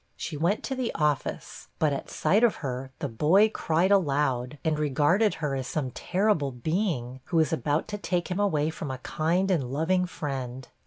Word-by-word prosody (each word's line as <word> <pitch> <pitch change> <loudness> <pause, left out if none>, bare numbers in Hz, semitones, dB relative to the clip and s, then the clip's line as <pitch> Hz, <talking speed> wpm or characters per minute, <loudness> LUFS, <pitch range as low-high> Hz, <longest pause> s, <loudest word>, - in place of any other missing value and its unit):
She 165 - -5
went 170 +8 0
to 270 - -2
the 255 -2 -2
office, 150 -3 -2
but 155 -2 +2
at 140 - -5
sight 210 +5 +2
of 235 - +4
her 130 0 -4
the 145 - -3
boy 160 - +4
cried 175 -1 +1
aloud, 145 -7 +1
and 155 -1 +1
regarded 150 - +2
her 150 -3 -2
as 135 -1 -3
some 135 -5 -2
terrible 180 - 0
being, 130 - -2
who 170 - -1
was 160 0 +3
about 150 -1 0
to 205 -1 -4
take 180 -2 -2
him 180 - -1
away 155 -7 +1
from 155 -2 -6
a 130 - -3
kind 170 +8 0
and 165 -7 +2
loving 160 +8 0
friend. 130 -6 -5
155 Hz, 190 wpm, -27 LUFS, 135-185 Hz, -, of